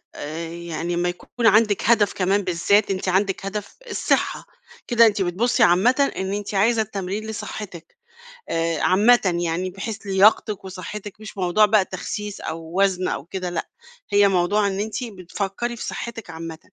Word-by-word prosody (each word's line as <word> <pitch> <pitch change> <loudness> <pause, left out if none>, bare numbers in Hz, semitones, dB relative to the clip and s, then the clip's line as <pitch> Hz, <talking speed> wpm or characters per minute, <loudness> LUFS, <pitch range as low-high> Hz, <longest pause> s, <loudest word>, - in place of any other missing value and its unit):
آآ، 165 +3 -5
يعني 170 0 -4
اما 175 +1 0
يكون 225 +6 -2
عندِك 215 -2 +4
هدف 215 -3 +4
كمان 195 +2 +1
بالذات 195 +3 +2
أنتِ 190 0 -3
عندِك 195 +1 0
هدف 200 +1 -5
الصحة، - - 0 0.4
كده 235 -2 +6
أنتِ 205 -2 +2
بتبصي 190 +7 +1
عامةً 245 +11 +4
إن 190 +1 -2
أنتِ 205 0 -4
عايزة 220 +3 +3
التمرين 205 +1 -4
لصحتِك 200 -5 -7 0.5
آآ، 165 -1 0
عامةً 195 -3 +4
يعني 175 +3 -1
بحيث 200 +3 -5
لياقتِِك 200 +1 +3
وصحتِك 195 +2 -8
مش 210 -1 -10
موضوع 185 +3 +4
بقى 210 -1 +4
التخسيس 205 +2 -5
أو 165 +4 -3
وزن 185 -2 +2
أو 140 - -3
كده 185 0 -4
لأ، 170 -2 -4 0.4
هي 205 0 +5
موضوع 195 +3 +2
إن 195 0 -2
أنتِ 220 +4 -3
بتفكري 200 +2 -4
في 235 - -7
صحتِك 230 -5 -6
عامةً. 165 -1 -7
195 Hz, 160 wpm, -22 LUFS, 180-210 Hz, 0.5 s, كده